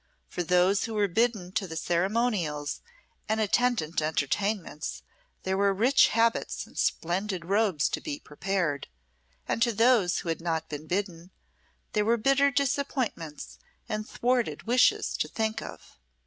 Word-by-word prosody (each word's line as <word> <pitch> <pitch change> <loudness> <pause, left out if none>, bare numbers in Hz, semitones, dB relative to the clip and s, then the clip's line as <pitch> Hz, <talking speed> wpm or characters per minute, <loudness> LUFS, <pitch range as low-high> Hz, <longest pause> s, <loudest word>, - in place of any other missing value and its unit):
For - - -4
those 180 +5 +3
who 225 -2 -5
were 205 -1 +2
bidden 210 -2 0
to 195 0 -2
the 160 - -7
ceremonials 175 -5 -1 0.5
and 220 0 +1
attendant 215 -7 +1
entertainments, 160 +3 -2 0.4
there 190 0 0
were 200 0 +2
rich 250 +7 +5
habits 230 +1 0
and - - -19
splendid 180 +1 -1
robes 195 -5 +2
to - - -3
be 295 -2 -5
prepared; 170 - -2 0.6
and - - -1
to 235 0 +4
those 225 -5 +3
who 170 - -5
had 165 - -2
not 160 -1 -2
been 150 +1 -7
bidden, 180 -2 -3 0.6
there 210 - +2
were 230 +2 +2
bitter 275 +4 +3
disappointments 260 - -2 0.3
and 215 0 -4
thwarted 245 -1 0
wishes 245 +3 +3
to - - -1
think 220 -1 -2
of. - - -11
200 Hz, 145 wpm, -28 LUFS, 170-230 Hz, 0.6 s, rich